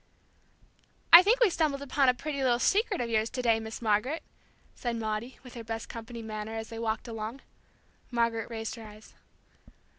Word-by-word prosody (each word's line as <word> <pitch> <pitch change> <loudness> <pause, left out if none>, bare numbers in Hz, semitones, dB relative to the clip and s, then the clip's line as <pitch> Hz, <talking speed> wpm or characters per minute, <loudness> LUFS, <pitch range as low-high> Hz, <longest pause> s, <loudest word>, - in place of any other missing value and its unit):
"I 340 - +14
think 440 +6 +3
we 450 -6 +5
stumbled 295 -4 0
upon 280 -1 +3
a 250 - +3
pretty 280 +1 -4
little 250 -2 +3
secret 405 - +2
of 240 - -1
yours 220 0 +1
to 255 - -3
day, 230 -2 +3
Miss 220 +1 -7
Margaret," 225 +9 +1 0.5
said 240 -2 -3
Maudie, 220 +2 -3
with 250 - -12
her 235 - -7
best 225 0 -5
company 230 0 -8
manner, 215 0 -5
as 225 0 -5
they 225 - -7
walked 225 +1 -2
along. 225 +3 -5 0.7
Margaret 230 -2 0
raised 225 -1 -4
her 230 - -9
eyebrows. 215 0 -13
230 Hz, 180 wpm, -29 LUFS, 220-260 Hz, 0.7 s, I